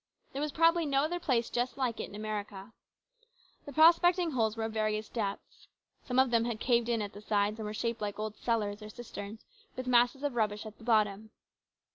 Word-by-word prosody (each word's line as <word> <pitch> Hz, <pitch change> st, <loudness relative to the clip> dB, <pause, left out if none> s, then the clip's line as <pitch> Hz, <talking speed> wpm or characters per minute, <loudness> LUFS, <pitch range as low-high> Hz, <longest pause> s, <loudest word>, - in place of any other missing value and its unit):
There 275 Hz, -, -3 dB
was 300 Hz, 0 st, -1 dB
probably 330 Hz, +1 st, +3 dB
no 275 Hz, 0 st, +2 dB
other 350 Hz, +3 st, -1 dB
place 240 Hz, -8 st, 0 dB
just 245 Hz, +2 st, -1 dB
like 250 Hz, -4 st, -1 dB
it -, -, -4 dB
in -, -, -11 dB
America. 210 Hz, 0 st, -5 dB, 0.9 s
The -, -, -6 dB
prospecting 340 Hz, +3 st, +5 dB
holes 225 Hz, -4 st, 0 dB
were 225 Hz, -, -2 dB
of 220 Hz, 0 st, -3 dB
various 215 Hz, -1 st, -1 dB
depths. 205 Hz, -4 st, -5 dB, 0.4 s
Some 250 Hz, -, -1 dB
of 260 Hz, -1 st, +4 dB
them 230 Hz, -1 st, +3 dB
had 235 Hz, -2 st, -3 dB
caved 235 Hz, -1 st, +2 dB
in 230 Hz, -2 st, +1 dB
at 205 Hz, -, -6 dB
the 205 Hz, -, -10 dB
sides 210 Hz, 0 st, 0 dB
and 215 Hz, -, -4 dB
were 210 Hz, -, -4 dB
shaped 230 Hz, 0 st, -2 dB
like 205 Hz, -1 st, -3 dB
old 215 Hz, 0 st, -4 dB
cellars 210 Hz, -3 st, -1 dB
or 210 Hz, -, -8 dB
cisterns 215 Hz, -2 st, -8 dB, 0.3 s
with 255 Hz, -, -5 dB
masses 245 Hz, +2 st, +3 dB
of 290 Hz, -2 st, -1 dB
rubbish 210 Hz, -2 st, -1 dB
at 215 Hz, -1 st, -10 dB
the -, -, -14 dB
bottom. 215 Hz, -2 st, +1 dB
225 Hz, 210 wpm, -31 LUFS, 215-255 Hz, 0.9 s, prospecting